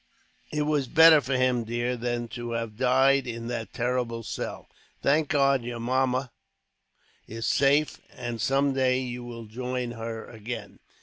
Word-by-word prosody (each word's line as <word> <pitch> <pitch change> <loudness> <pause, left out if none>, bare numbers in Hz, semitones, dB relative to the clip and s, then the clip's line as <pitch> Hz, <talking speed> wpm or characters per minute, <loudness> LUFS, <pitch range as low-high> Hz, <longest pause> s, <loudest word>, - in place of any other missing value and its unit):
"It 150 -1 0
was 150 -3 0
better 160 +2 +7
for 130 -1 -1
him, 125 -2 +2
dear, 120 +2 -2
than 120 0 -2
to 120 -1 -5
have 115 -2 -3
died 130 +2 +3
in 115 -1 -5
that 115 -4 -4
terrible 120 -1 -2
cell. - - -5 0.4
Thank 150 +2 +3
God 140 -2 +3
your 120 0 -5
mamma 130 +1 0 1.0
is 115 +1 -5
safe, 145 +2 +2
and 120 -2 -5
some 135 +4 +2
day 130 -1 +2
you 125 -1 -5
will 115 -1 -8
join 125 +2 -4
her 115 -1 -6
again. 110 -1 -7
125 Hz, 150 wpm, -27 LUFS, 115-135 Hz, 1.0 s, better